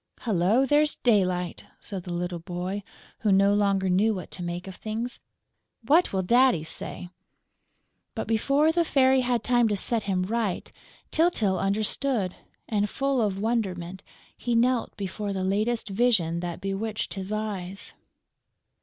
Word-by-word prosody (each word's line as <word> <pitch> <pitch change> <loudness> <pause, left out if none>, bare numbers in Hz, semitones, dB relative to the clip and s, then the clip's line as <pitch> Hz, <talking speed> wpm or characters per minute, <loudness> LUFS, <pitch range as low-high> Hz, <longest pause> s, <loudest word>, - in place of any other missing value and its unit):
"Hullo, 215 +4 +2
there's 295 +2 +3
daylight!" 185 -6 +1
said 190 -4 -7
the 180 - -6
little 175 0 -3
boy, 180 +3 -4 0.4
who 215 - +1
no 195 +1 +5
longer 200 -2 +2
knew 205 +4 +3
what 180 - -7
to 180 - -5
make 175 +1 -4
of 190 - -6
things. 225 +5 -4 0.7
"What 320 +8 +4
will 190 -1 0
Daddy 240 -3 +4
say?" 170 +2 -4 1.1
But, - - -3
before 275 +8 +3
the 340 +1 +2
Fairy 265 -4 +4
had 245 -1 0
time 240 -1 +3
to 205 -2 0
set 225 +2 0
him 185 -2 0
right, 215 -1 -2 0.4
Tyltyl 230 - +2
understood; 210 +1 -1 0.3
and, 210 -1 0
full 275 -2 0
of 200 -3 0
wonderment, 190 -5 -2 0.3
he 240 -1 -2
knelt 245 +1 +1
before 200 +1 -4
the 190 -1 -2
latest 215 +5 0
vision 195 -6 +2
that 175 -1 -5
bewitched 205 +3 -3
his 195 0 -5
eyes. 200 -3 -4
205 Hz, 145 wpm, -26 LUFS, 185-240 Hz, 1.1 s, no